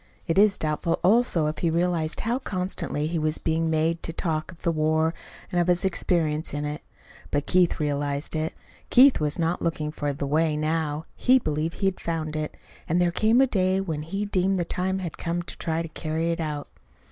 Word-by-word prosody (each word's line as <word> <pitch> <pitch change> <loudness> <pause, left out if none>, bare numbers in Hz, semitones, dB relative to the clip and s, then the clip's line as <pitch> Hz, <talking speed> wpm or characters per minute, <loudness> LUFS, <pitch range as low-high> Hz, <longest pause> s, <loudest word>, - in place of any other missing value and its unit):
It 165 +2 +2
is 205 -1 +5
doubtful, 155 +2 0
also, 195 -4 +3
if 155 +1 -2
he 170 - +1
realized 170 -1 0
how 235 +3 0
constantly 185 - -2
he 165 +1 -1
was 155 0 0
being 160 0 0
made 160 +1 +1
to - - -4
talk 160 0 -2
of 170 - -17
the 170 - +2
war 160 +1 +1 0.4
and 175 - +2
of 175 - 0
his 180 +1 +2
experience 165 -4 0
in 145 0 -2
it. 150 0 -4 0.5
But 145 0 -1
Keith 180 -2 +3
realized 145 0 -1
it. 155 +1 -2 0.3
Keith 265 +2 +7
was 150 -1 0
not 170 +1 0
looking 155 -2 -1
for 145 -2 -2
"the 140 0 -4
way" 155 +2 +1
now. 155 0 -1
He 255 +1 +4
believed 155 - -2
he - - +1
had 195 -1 +1
found 160 -2 -3
it; 155 0 -4 0.3
and 170 +3 +2
there 175 -1 +3
came 220 +7 +3
a - - +6
day 190 -5 +1
when 165 -6 -3
he 195 +7 -3
deemed 195 -1 +1
the 175 - 0
time 185 +2 -1
had 180 -4 -5
come 170 +1 -2
to - - -9
try 165 0 -1
to - - -5
carry 160 +1 -2
it 165 - -2
out. 150 -3 -3
165 Hz, 210 wpm, -25 LUFS, 155-180 Hz, 0.5 s, Keith